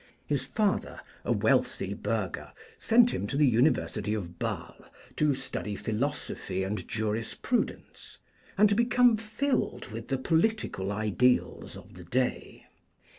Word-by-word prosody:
His - - -1
father, 210 -2 -1 0.2
a - - -1
wealthy - - +1
burgher, - - -3 0.3
sent 240 +1 +5
him 100 - -2
to 140 - -2
the 150 - +5
University 120 -3 +2
of 90 -4 -6
Basle - - -4 0.3
to 150 -2 +3
study 130 -5 -4
philosophy 110 -5 -3
and 100 +3 -3
jurisprudence 110 - -3 0.4
and 210 +2 +7
to 205 - +2
become 240 +1 +4
filled 215 - -2
with 115 +1 -7
the 135 - 0
political 160 - 0
ideals 110 +4 +1
of - - -14
the 90 - -11
day. 125 +7 -2
130 Hz, 125 wpm, -29 LUFS, -, 0.4 s, and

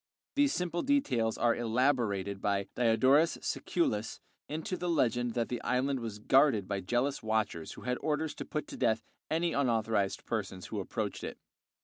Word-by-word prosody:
These 285 0 +3
simple 175 -1 -1
details 130 - +1
are 120 0 +3
elaborated 115 -5 0
by 100 -1 +1
Diodorus 130 +7 +4
Siculus 110 -11 -1 0.3
into 160 +4 -3
the 180 -1 -3
legend 120 -6 +1
that 115 -1 0
the 120 - -3
island 130 +2 0
was 115 -3 -5
guarded 130 -3 +4
by 100 -1 -1
jealous 120 +8 0
watchers 110 -7 -1
who - - -11
had 125 0 -2
orders 155 0 -1
to - - -6
put 150 -1 -3
to - - -7
death 115 -3 +1 0.3
any 165 +1 +1
unauthorized 110 -6 +1
persons 95 -5 -3
who - - -4
approached - - -3
it. - - -5
120 Hz, 160 wpm, -31 LUFS, 110-145 Hz, 0.3 s, Diodorus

